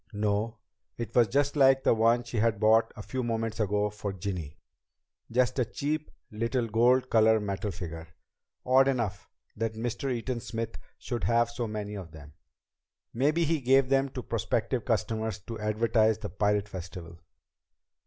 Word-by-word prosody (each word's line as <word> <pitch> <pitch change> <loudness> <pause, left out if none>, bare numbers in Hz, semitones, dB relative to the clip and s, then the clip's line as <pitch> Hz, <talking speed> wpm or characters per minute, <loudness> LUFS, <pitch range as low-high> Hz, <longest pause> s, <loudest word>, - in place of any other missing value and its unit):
No, 105 +2 -1 0.4
it 115 -3 -5
was 120 -2 +5
just 140 +6 +1
like 135 -2 +5
the - - +4
one 115 +2 +3
she 120 0 -6
had 110 -1 +2
bought 110 +1 +4
a 110 - -8
few 130 +4 -3
moments 115 -2 -2
ago 105 0 +1
for 105 -1 -4
Ginny 90 -5 -5 0.7
just 125 +2 +1
a 125 - +3
cheap 150 +6 -3 0.2
little 115 +3 -1
gold 125 +4 +3
colored 110 -1 +5
metal 100 +1 -3
figure. 85 -3 -7 0.6
Odd, 130 +1 +5
though, 120 -7 +1 0.5
that 110 0 -2
Mr. 120 +4 -3
Eaton 120 0 -2
Smith 115 0 -5 0.2
should 120 -8 -4
have 115 +3 +2
so 120 0 -3
many 105 -1 -5
of 90 -6 -8
them. 75 -2 -12 0.8
Maybe 150 +7 +2
he 160 -1 0
gave 130 +1 +4
them 135 0 +2
to 125 - -5
prospective 115 +1 -1
customers 110 -1 -1
to 115 +3 -7
advertise 110 +1 +2
the - - -6
Pirate 105 +2 0
Festival. 85 -3 -8
115 Hz, 160 wpm, -29 LUFS, 105-125 Hz, 0.8 s, was